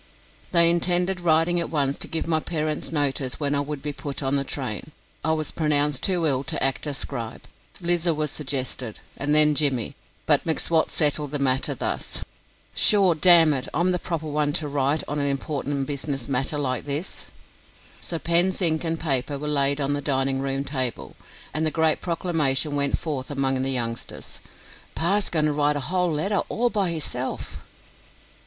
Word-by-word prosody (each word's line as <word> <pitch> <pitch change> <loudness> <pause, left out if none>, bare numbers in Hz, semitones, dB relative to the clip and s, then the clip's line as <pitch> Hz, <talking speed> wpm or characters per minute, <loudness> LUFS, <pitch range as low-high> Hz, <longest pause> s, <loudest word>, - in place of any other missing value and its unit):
They 170 -1 +5
intended 180 +1 +1
writing 170 +1 +3
at 170 - -3
once 140 -3 0
to - - +1
give 165 - -2
my 160 -1 +1
parents 155 -2 -2
notice 140 -4 -1
when 145 -1 0
I 145 - +2
would 145 0 -4
be 150 -1 -3
put 145 0 -5
on 135 +1 +1
the 140 - +1
train. 135 +1 -5 0.3
I 160 - +1
was 155 -2 0
pronounced 150 -3 +1
too 180 -3 +1
ill 135 -3 +1
to 160 -4 -2
act 135 +2 -1
as 145 -2 -2
scribe; 120 -5 -5 0.4
Lizer 175 -1 +2
was 155 -2 -1
suggested, 130 -6 -3 0.2
and 145 +2 0
then 150 0 +7
Jimmy, 140 -6 0 0.3
but - - +3
M'Swat 160 0 +1
settled 150 -1 +2
the 145 - -2
matter 135 -1 +1
thus: - - -3 0.5
"Sure, 195 -5 +5
damn 165 -1 +7
it! 130 -2 -2
I'm 175 +2 +2
the 180 - 0
proper 165 -3 -4
one 150 -1 0
to 150 - 0
write 140 +1 0
on 145 +1 -2
an 140 - 0
important 140 0 -2
business 140 -2 -3
matther 135 +2 0
like 130 -4 -2
this 145 +6 -2
here." - - -19 0.7
So 170 - -3
pens, 170 +3 +2
ink, 160 -4 +1
and 165 -1 -2
paper 140 -2 -1
were 150 +2 -5
laid 140 -1 +2
on 140 0 0
the 145 - -1
dining 135 -1 0
room 135 0 -1
table, 130 -5 -3 0.4
and 155 - 0
the 160 - +3
great 160 0 +1
proclamation 160 -5 0
went 140 -1 +1
forth 140 -5 -4
among 135 -2 0
the 135 - 0
youngsters, 115 -3 -3 0.6
"Pa 175 +5 +2
is 205 - +1
goin' 155 -3 +1
to 150 - +1
write 145 0 +1
a - - -1
whole 180 -2 +1
letter 190 +7 0
all 240 +1 0
by 200 -4 0
hisself." 145 -6 -4
150 Hz, 185 wpm, -24 LUFS, 135-165 Hz, 0.7 s, then